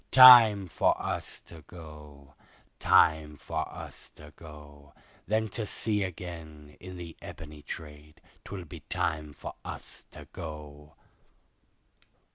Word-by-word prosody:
Time 115 -7 +9
for 80 - +1
us - - -5
to 85 -2 -14
go, 75 -4 -13 0.5
Time 80 -2 +3
for 80 +2 -4
us - - -10
to 75 0 -15
go, 75 -3 -14 0.3
Then 110 +1 +1
to 110 +1 -5
sea 105 -1 -1
again, 80 -5 -7
in 90 0 -10
the 85 -2 -9
ebony 75 -1 -10
trade, 75 0 -10 0.2
'twill 95 -3 -8
be 75 - -10
time 75 -2 -2
for - - -9
us - - -9
to - - -12
go. 75 -1 -9
80 Hz, 120 wpm, -29 LUFS, 75-90 Hz, 0.5 s, Time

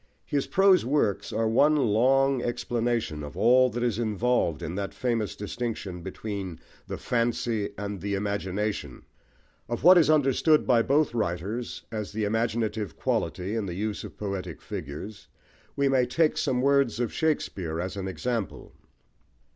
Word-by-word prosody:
His 140 -2 -1
prose 195 -1 +5
works 125 -6 0
are 115 +1 0
one 145 +7 +4
long 135 +2 +3
explanation 120 -9 -1
of 75 +3 -8
all 125 +4 +5
that 120 +1 -3
is 120 -3 0
involved 110 -6 0
in 85 0 -4
that 100 +1 -4
famous 115 -4 -1
distinction 105 -4 -4
between 95 -2 -5 0.3
the - - -4
Fancy 115 -3 -1
and 100 -2 -5
the 100 +1 -1
Imagination. 100 - -3 0.6
Of 120 - -3
what 180 +2 +9
is 155 -3 +3
understood 150 +1 +4
by 120 -3 +4
both 140 +3 +2
writers 105 +3 -3
as 105 -2 -4
the 110 0 -2
imaginative 110 -2 -1
quality 95 +4 -1
in 110 -3 -2
the 85 - -4
use 105 +2 -3
of - - -10
poetic 95 -5 -4
figures, 95 +9 -7 0.5
we 140 0 +2
may 130 -2 +3
take 155 +5 +2
some 130 -3 0
words 140 -4 +3
of 120 -2 -1
Shakespeare 95 - -1
as 95 +2 -3
an 95 -1 -4
example. 115 +2 -4
110 Hz, 150 wpm, -27 LUFS, 100-125 Hz, 0.6 s, what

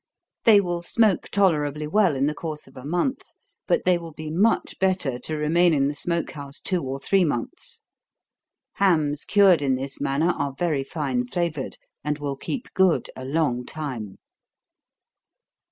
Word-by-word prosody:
They 215 -3 +8
will 175 -3 -2
smoke 210 +2 +2
tolerably 150 -7 +1
well, 190 -1 +3
in 135 +1 +1
the 150 - 0
course 155 -1 -6
of 135 - -19
a 130 - -10
month, 175 - -1 0.5
but - - +1
they 180 -1 +3
will 165 -2 -9
be 155 0 -7
much 200 +8 +1
better, 185 -10 +1
to 155 +3 -4
remain 165 +3 +3
in 140 -1 +2
the - - -3
smoke 170 +3 -2
house 140 -2 -8
two 185 -2 -1
or 135 0 -4
three 190 +7 +2
months. 120 -8 -4 0.9
Hams 155 -7 +2
cured 195 -5 +5
in 135 -2 +2
this 135 +2 -5
manner 150 +6 +1
are 140 -3 -3
very 155 -5 0
fine 135 -4 -2
flavored, 160 -2 -3 0.3
and 150 +1 -1
will 145 -2 -3
keep 240 - -6
good 190 -2 +2
a 130 - -8
long 135 -4 0
time. 125 -9 -6
155 Hz, 165 wpm, -24 LUFS, 140-175 Hz, 0.9 s, They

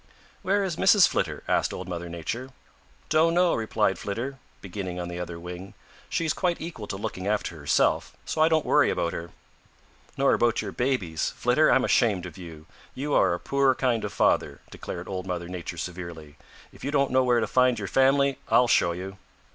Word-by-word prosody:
"Where 200 +1 +1
is 180 -4 -3
Mrs. 195 -1 +6
Flitter?" - - -2
asked - - +1
Old - - -7
Mother 85 -1 -5
Nature. 100 +10 -5 0.6
"Don't 160 +2 +3
know," 180 -1 +4
replied 110 -4 0
Flitter, 125 +7 -4 0.2
beginning 95 -2 -6
on 90 0 -4
the 85 0 -5
other 85 -1 -6
wing. 90 +3 -9 0.3
"She's 165 -2 0
quite 180 -2 -1
equal 160 -11 -7
to 95 - -4
looking 95 -1 -5
after 105 -4 -1
herself, 75 0 +1
so 155 - -2
I 160 - +5
don't 160 -1 +2
worry - - +4
about 85 - -1
her." 85 0 -6 0.9
"Nor 135 0 +3
about 120 -1 +2
your - - -3
babies. 105 - -1
Flitter, - - +3
I'm - - +4
ashamed 105 -7 +2
of - - -9
you. 85 -4 -10 0.3
You 145 +3 -3
are - - +4
a - - -7
poor 140 -1 +2
kind 125 -4 0
of - - -3
father," - - +1
declared 85 0 -7
Old 95 -1 -5
Mother 85 -2 -3
Nature 90 -1 -6
severely. 85 -4 -7 0.4
"If - - -15
you 140 - -2
don't 140 -2 +1
know 130 0 +4
where 120 -1 +3
to - - +1
find 125 -1 +3
your 100 - -4
family, 135 +3 +3
I'll 125 - +5
show 85 -7 +3
you." 95 +3 -7
105 Hz, 195 wpm, -26 LUFS, 90-135 Hz, 0.9 s, Mrs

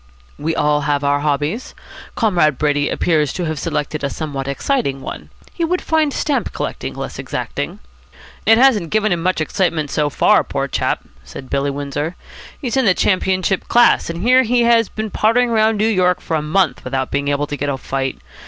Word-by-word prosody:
"We 160 +2 -1
all 150 -1 +2
have 145 -1 +1
our 145 0 +2
hobbies. 150 - -2 0.4
Comrade 170 - +2
Brady 145 -1 +1
appears 155 -5 +1
to 180 - -3
have 155 -2 -3
selected 150 -2 -3
a 140 - 0
somewhat 140 -3 -5
exciting 140 - -1
one. - - -8 0.2
He 340 - -3
would 360 +2 +1
find 315 -2 +1
stamp 285 +1 -1
collecting - - -4
less - - -6
exacting." - - -4 0.7
"It 225 - +7
hasn't 235 -10 +4
given 215 +1 +1
him 175 -1 0
much 185 0 0
excitement 160 -2 -1
so 150 -1 +1
far, - - +3
poor - - -3
chap," - - -1 0.2
said 70 - -10
Billy 140 +1 0
Windsor. 145 +4 -3 0.4
"He's 260 -2 -2
in 265 - +3
the 190 -4 +4
championship 185 -1 +1
class, 240 -6 +4
and 170 +2 -4
here 255 +2 +5
he 245 0 +2
has 230 -2 +4
been 215 -1 -5
pottering 235 +3 +2
about 220 0 +3
New 215 +1 +1
York 185 -4 +2
for 165 - -3
a 155 - 0
month 160 +2 0
without 130 0 -2
being 140 0 -1
able 145 0 0
to 145 - -5
get 145 0 -2
a 135 - -1
fight. 135 0 -3
165 Hz, 190 wpm, -18 LUFS, 145-220 Hz, 0.7 s, It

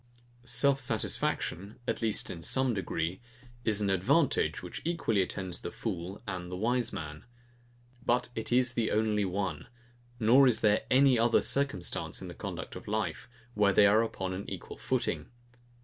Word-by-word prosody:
Self 140 +1 +5
satisfaction, 100 -5 -1
at - - -1
least 110 -2 -1
in 85 - -7
some 130 +6 +1
degree, 95 -2 -3 0.4
is 105 -2 0
an 100 -1 +1
advantage, 95 -1 +2
which - - -6
equally 160 - +1
attends 95 -1 -4
the - - -4
fool 90 +5 -5
and 90 -2 -4
the - - -3
wise 120 +3 +1
man: 75 -1 -7 0.8
But 125 -1 +1
it 110 0 -3
is 125 0 +3
the 115 -2 0
only 105 -1 +1
one; 95 -4 -3 0.5
nor 125 +4 +6
is 120 - +3
there 105 -1 +3
any 130 -2 +5
other 115 0 +3
circumstance 135 -10 -1
in - - -8
the - - -7
conduct - - -6
of - - -9
life, 110 +3 -2 0.2
where 105 -2 +3
they 100 - +6
are 105 +2 +5
upon 95 -5 -3
an 95 +2 -6
equal - - -8
footing. - - -1
105 Hz, 165 wpm, -30 LUFS, 95-120 Hz, 0.8 s, nor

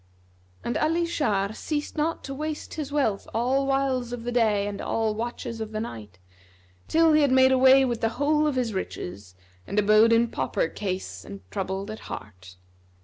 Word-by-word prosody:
'" 90 0 -33
And 240 - -1
Ali 330 +2 +1
Shar 215 -12 0
ceased 295 +5 -4
not 315 +2 -1
to 275 - -5
waste 305 +2 -5
his 300 -3 -5
wealth 245 -9 0
all 260 +4 +1
whiles 270 -3 0
of 245 -1 -5
the 245 - -3
day 215 -4 +2
and 205 -1 -4
all 225 -1 0
watches 230 0 -5
of 220 0 -5
the 215 - -2
night, 110 - -7 0.7
till 325 0 +4
he 305 - +5
had 285 - +4
made 260 0 +6
away 265 +1 +6
with 240 -3 -2
the 225 - +2
whole 300 +1 +2
of 295 - -1
his 245 -4 -1
riches 95 - -6 0.3
and 200 - -4
abode 215 +2 +5
in 230 +1 +4
pauper 130 +1 -1
case 185 - -5
and 100 - -9
troubled 190 - -3
at 215 - -7
heart. 95 -3 -9
230 Hz, 190 wpm, -26 LUFS, 200-275 Hz, 0.7 s, made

